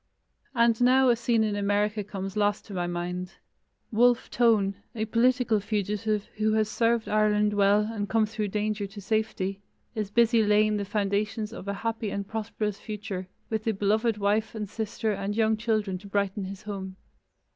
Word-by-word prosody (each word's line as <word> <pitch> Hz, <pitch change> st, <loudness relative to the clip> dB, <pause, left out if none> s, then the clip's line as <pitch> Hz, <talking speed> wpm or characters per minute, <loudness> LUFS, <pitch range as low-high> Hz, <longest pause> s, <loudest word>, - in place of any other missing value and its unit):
And 235 Hz, -1 st, +3 dB
now 255 Hz, +1 st, +5 dB
a 240 Hz, -, +5 dB
scene 230 Hz, -1 st, +1 dB
in 210 Hz, -1 st, 0 dB
America 205 Hz, +1 st, 0 dB
comes 195 Hz, -1 st, -6 dB
last 205 Hz, -1 st, +1 dB
to 205 Hz, -, -10 dB
my 175 Hz, -2 st, -1 dB
mind. 180 Hz, +1 st, -4 dB, 0.6 s
Wolfe 240 Hz, +2 st, +3 dB
Tone, 220 Hz, -5 st, +3 dB, 0.2 s
a 220 Hz, -1 st, -1 dB
political 235 Hz, 0 st, +2 dB
fugitive 210 Hz, 0 st, -1 dB
who 215 Hz, 0 st, +2 dB
has 215 Hz, -1 st, +2 dB
served 230 Hz, 0 st, +1 dB
Ireland 210 Hz, 0 st, +2 dB
well 205 Hz, 0 st, +4 dB
and 210 Hz, -1 st, -3 dB
come 225 Hz, -1 st, +3 dB
through 215 Hz, 0 st, -3 dB
danger 210 Hz, 0 st, -2 dB
to 200 Hz, +1 st, -10 dB
safety, 200 Hz, -2 st, -1 dB, 0.3 s
is 215 Hz, -4 st, -3 dB
busy 230 Hz, +1 st, +4 dB
laying 210 Hz, 0 st, +3 dB
the 200 Hz, -, -2 dB
foundations 210 Hz, +2 st, -1 dB
of 200 Hz, -, -8 dB
a 200 Hz, -, -1 dB
happy 225 Hz, -1 st, -1 dB
and 200 Hz, 0 st, -4 dB
prosperous 215 Hz, -1 st, -3 dB
future, 205 Hz, -4 st, -5 dB, 0.2 s
with 220 Hz, 0 st, -2 dB
a 220 Hz, -, +3 dB
beloved 215 Hz, +3 st, +1 dB
wife 210 Hz, +2 st, 0 dB
and 210 Hz, -1 st, -3 dB
sister 220 Hz, +1 st, -2 dB
and 200 Hz, 0 st, -3 dB
young 220 Hz, -1 st, +3 dB
children 215 Hz, -4 st, -1 dB
to 200 Hz, -, -12 dB
brighten 200 Hz, 0 st, -1 dB
his 195 Hz, +2 st, -8 dB
home. 195 Hz, -3 st, -6 dB
210 Hz, 175 wpm, -27 LUFS, 200-220 Hz, 0.6 s, now